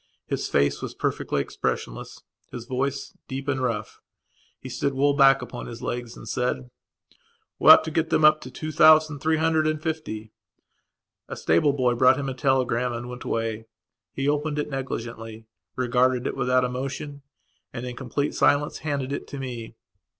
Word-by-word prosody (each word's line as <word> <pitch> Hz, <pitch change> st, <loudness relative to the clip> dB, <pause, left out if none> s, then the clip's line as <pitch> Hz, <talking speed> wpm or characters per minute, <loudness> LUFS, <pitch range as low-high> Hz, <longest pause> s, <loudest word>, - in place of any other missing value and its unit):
His -, -, -3 dB
face 70 Hz, 0 st, +1 dB
was -, -, -6 dB
perfectly 70 Hz, -, -1 dB
expressionless; -, -, -4 dB, 0.3 s
his 120 Hz, -1 st, -7 dB
voice 135 Hz, +2 st, -2 dB
was -, -, -32 dB
deep 135 Hz, +1 st, -5 dB
and 135 Hz, -2 st, 0 dB
rough. 115 Hz, -4 st, -3 dB, 0.6 s
He -, -, -9 dB
stood 130 Hz, +2 st, -2 dB
well 140 Hz, +2 st, +3 dB
back 135 Hz, -1 st, +5 dB
upon 120 Hz, -, -7 dB
his 115 Hz, -1 st, -9 dB
legs 120 Hz, -1 st, -4 dB
and -, -, -11 dB
said: 125 Hz, 0 st, -2 dB, 0.9 s
"We -, -, +5 dB
ought -, -, +10 dB
to 160 Hz, -, -5 dB
get 160 Hz, 0 st, 0 dB
them 155 Hz, -1 st, +3 dB
up 155 Hz, 0 st, +6 dB
to 130 Hz, -, -8 dB
two 155 Hz, +4 st, -6 dB
thousand 155 Hz, -1 st, +5 dB
three 160 Hz, +2 st, +1 dB
hundred 160 Hz, -1 st, +2 dB
and 155 Hz, 0 st, 0 dB
fifty." 155 Hz, -10 st, -4 dB, 1.0 s
A -, -, -6 dB
stable 85 Hz, -, +2 dB
boy 125 Hz, -3 st, +2 dB
brought 130 Hz, +2 st, +5 dB
him 140 Hz, -1 st, -3 dB
a -, -, -3 dB
telegram 125 Hz, -2 st, +1 dB
and 120 Hz, +1 st, -5 dB
went 125 Hz, 0 st, -8 dB
away. 115 Hz, -1 st, -2 dB, 0.4 s
He 135 Hz, +1 st, -3 dB
opened 150 Hz, +1 st, 0 dB
it 150 Hz, 0 st, -2 dB
negligently, 115 Hz, -4 st, -5 dB, 0.3 s
regarded 125 Hz, 0 st, +1 dB
it -, -, -2 dB
without 125 Hz, 0 st, +2 dB
emotion, 135 Hz, +3 st, -4 dB, 0.5 s
and, 115 Hz, -, -6 dB
in 125 Hz, -1 st, -6 dB
complete 140 Hz, +3 st, -2 dB
silence, 145 Hz, +1 st, +2 dB
handed 140 Hz, -3 st, -3 dB
it -, -, -5 dB
to 140 Hz, -, -7 dB
me. 120 Hz, -4 st, -6 dB
130 Hz, 175 wpm, -25 LUFS, 120-145 Hz, 1.0 s, ought